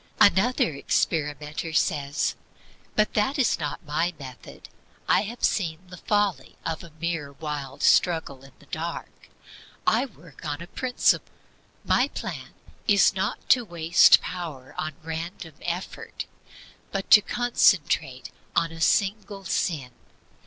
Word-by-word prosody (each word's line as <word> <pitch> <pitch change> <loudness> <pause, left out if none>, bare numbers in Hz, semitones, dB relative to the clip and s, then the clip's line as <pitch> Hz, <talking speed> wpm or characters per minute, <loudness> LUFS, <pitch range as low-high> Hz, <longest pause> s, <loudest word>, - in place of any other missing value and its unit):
2. - - +9
Another 195 -4 +1
experimenter 150 +2 -1
says: 145 -1 +1 0.6
"But 215 0 +2
that 215 +8 +1
is 250 -10 +2
not 150 +2 -4
my 165 +4 -1
method. 130 -3 -11 0.4
I - - +4
have 235 +3 -8
seen 165 -6 +1
the 180 - -10
folly 205 0 0
of 165 -1 -3
a 170 - -11
mere 165 -4 -3
wild 145 -3 -5
struggle 160 -6 +3
in 135 -1 -15
the - - -20
dark. 165 +3 -6 0.6
I 240 +5 +3
work 165 - -17
on 145 -2 -3
a 170 - -7
principle. 250 +7 +1 0.5
My - - +3
plan - - -7 0.3
is 200 -3 +5
not 190 -1 -3
to 250 - +5
waste 170 -3 +5
power 155 -8 -6
on 155 -1 -4
random 165 0 -6
effort, 175 +2 -5 0.7
but 195 -1 -4
to 210 - +10
concentrate 170 - +1 0.2
on 165 -1 +2
a 165 0 -9
single 200 +1 +1
sin. 145 -7 -1
165 Hz, 130 wpm, -26 LUFS, 150-195 Hz, 0.7 s, to